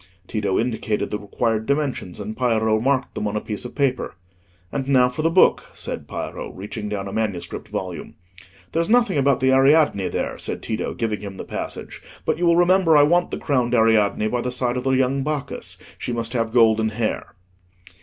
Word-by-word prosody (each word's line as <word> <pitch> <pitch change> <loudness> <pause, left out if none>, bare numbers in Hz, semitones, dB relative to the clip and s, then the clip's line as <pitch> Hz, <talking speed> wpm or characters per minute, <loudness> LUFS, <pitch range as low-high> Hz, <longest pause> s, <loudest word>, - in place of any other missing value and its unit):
Tito 100 -4 -1
indicated 110 -2 -1
the 105 - -2
required 110 +2 -1
dimensions, 140 -11 -1
and 105 +2 -5
Piero 110 -3 +2
marked 130 +2 0
them 105 - -2
on 105 - -3
a - - +1
piece 105 +2 -5
of 125 - -8
paper. 135 -3 0 0.6
"And 135 -1 -3
now 125 -2 +4
for 125 +5 -4
the 165 - +2
book," 185 +3 +4
said - - -4
Piero, - - -5
reaching 105 +2 -6
down 100 -2 -3
a 95 - -6
manuscript 100 -6 -3
volume. 90 -4 -5 0.6
"There's 165 +1 0
nothing 230 -9 +3
about 140 -2 +2
the 130 0 +4
Ariadne 135 - +4
there," - - -3
said - - -4
Tito, 110 0 -3
giving 110 -3 -2
him 100 -2 -7
the - - -5
passage; - - -6 0.2
"but - - 0
you 175 - +2
will 170 0 +5
remember 175 -2 +5
I 145 - +7
want 175 +4 +3
the - - -4
crowned 125 -4 0
Ariadne 110 -2 +3
by 120 +1 -1
the 125 - -2
side 125 -1 0
of 125 - -3
the - - +2
young 130 +1 +2
Bacchus: 145 -1 -3 0.2
she - - -4
must 115 -1 -3
have 115 -2 0
golden 110 -2 +4
hair." 110 -2 -3
120 Hz, 195 wpm, -22 LUFS, 110-140 Hz, 0.6 s, I